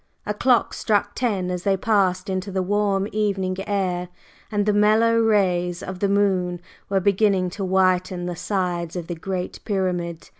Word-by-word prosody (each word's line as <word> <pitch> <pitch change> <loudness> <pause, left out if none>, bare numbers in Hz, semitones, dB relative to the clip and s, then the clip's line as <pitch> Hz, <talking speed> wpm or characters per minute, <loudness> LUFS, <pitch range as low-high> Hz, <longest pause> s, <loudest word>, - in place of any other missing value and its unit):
A 210 - -1
clock 245 +3 +2
struck 205 -1 0
ten 200 -7 -1
as 180 -1 -3
they 195 0 +1
passed 190 -2 +1
into 190 +1 -3
the 190 -1 -1
warm 200 0 +1
evening 195 -3 -1
air, 180 -3 -1 0.4
and 205 -1 0
the 210 - +2
mellow 220 +2 +4
rays 180 -5 +1
of 190 -1 -6
the 200 - +1
moon 190 -3 +1 0.3
were 195 -1 +2
beginning 195 -1 +2
to 195 - -5
whiten 185 -1 +1
the 175 0 -3
sides 175 -3 -2
of 175 -2 -4
the 175 - -4
Great 180 +2 -4
Pyramid. 180 -5 -2
190 Hz, 165 wpm, -23 LUFS, 180-205 Hz, 0.4 s, mellow